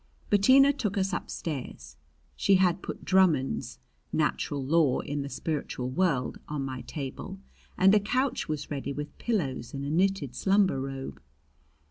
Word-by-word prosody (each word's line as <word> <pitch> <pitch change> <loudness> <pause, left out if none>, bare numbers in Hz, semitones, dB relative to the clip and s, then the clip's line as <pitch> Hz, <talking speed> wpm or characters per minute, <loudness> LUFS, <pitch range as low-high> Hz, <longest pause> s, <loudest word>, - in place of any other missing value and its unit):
Bettina 260 +8 +6
took 220 -7 -2
us 190 0 0
upstairs. 130 - -5 0.4
She 200 - +3
had 185 -1 +3
put - - -7
Drummond's 160 - +2 0.3
"Natural 140 -2 -1
Law 150 -2 +3
in 145 0 -3
the 140 - -5
Spiritual 140 -5 -3
World" 140 -4 0
on 145 -2 -3
my 130 -2 -5
table 150 +7 -6 0.4
and 195 +2 +6
a 210 - +6
couch 250 - -1
was 155 -1 -4
ready 140 -1 -3
with 145 +1 -6
pillows 140 - -2
and 140 0 -4
a 145 - -3
knitted 180 -6 +1
slumber 190 -1 +2
robe. 135 - -6
155 Hz, 145 wpm, -28 LUFS, 135-195 Hz, 0.4 s, Bettina